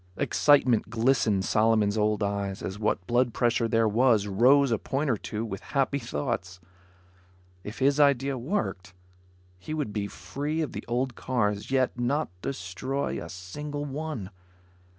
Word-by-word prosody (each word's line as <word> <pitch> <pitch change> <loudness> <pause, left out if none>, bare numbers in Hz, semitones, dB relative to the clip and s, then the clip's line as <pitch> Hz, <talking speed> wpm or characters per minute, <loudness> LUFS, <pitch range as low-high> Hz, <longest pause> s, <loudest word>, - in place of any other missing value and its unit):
Excitement 130 -5 +3
glistened 115 -4 +2
Solomon's 110 -1 +2
old 105 -1 +1
eyes 100 -1 -2
as 95 +2 -5
what 105 -3 0
blood 120 +1 +1
pressure 120 -1 +2
there 115 0 +2
was 110 -1 +3
rose 125 +7 +4
a 115 - +1
point 140 +1 -1
or - - +2
two 105 +2 -4
with 100 -3 -6 0.2
happy 140 +1 +2
thoughts. 115 -8 -4 1.0
If 105 - -7
his 140 +2 +2
idea 140 -1 +3
worked, 120 - -3 0.6
he 155 +12 -5
would 145 -9 -3
be 100 -2 -2
free 140 - -4
of 150 - -4
the - - -6
old 125 +2 -1
cars, 105 -5 -1
yet 130 -2 +1
not 140 +6 0
destroy 130 +6 -3
a - - -9
single 145 +12 -6
one. 140 -8 -5
120 Hz, 150 wpm, -27 LUFS, 105-140 Hz, 1.0 s, rose